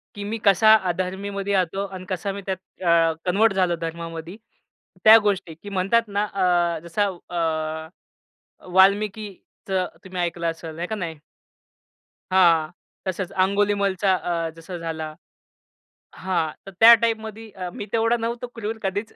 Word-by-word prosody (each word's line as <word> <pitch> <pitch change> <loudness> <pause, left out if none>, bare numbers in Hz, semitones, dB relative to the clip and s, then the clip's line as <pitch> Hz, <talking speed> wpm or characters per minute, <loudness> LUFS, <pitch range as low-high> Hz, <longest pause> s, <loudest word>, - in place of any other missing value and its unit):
की 205 - -6
मी 220 +3 -3
कसा 210 +3 +6 0.2
अधर्मीमध्ये 195 +3 -3
येतो 195 +1 0
आणि 185 -1 -9
कसा 195 +2 -2
मी 200 +1 -6
त्यात 190 -1 -1 0.3
अ, 165 -1 +4 0.2
कन्व्हर्ट 210 +3 +3
झालो 180 -2 +1
धर्मामध्ये. 165 +2 -6 0.7
त्या 220 +1 +10
गोष्टी 195 -5 -1
की 205 - -7
म्हणतात 195 +5 +2
ना, 205 +1 0
अ, 175 -4 +1
जसा 205 +5 0 0.2
अ, 160 -1 -3 0.6
वाल्मिकीचं 195 -1 +1 0.2
तुम्ही 185 -1 -5
ऐकलं 170 -1 -2
असेल 165 0 -9
हे 175 - -2
का 220 - -3
नाही? 170 -5 -4 1.2
हां, 170 -4 +4 0.3
तसंच 190 0 -3
अंगुलीमाल 200 0 +1
अ, 175 -3 +1
जसा 175 +2 -8
झाला. 160 -2 -5 1.0
हां. 170 -5 -1
तर - - -7
त्या 230 +1 +11
टाइपमध्ये 220 -1 -2 0.3
मी 205 - -5
तेवढा 230 +1 +2
नव्हतो 235 +1 -3
क्रूर 220 0 -4
कधीच. 200 +3 -3
190 Hz, 135 wpm, -23 LUFS, 170-205 Hz, 1.2 s, त्या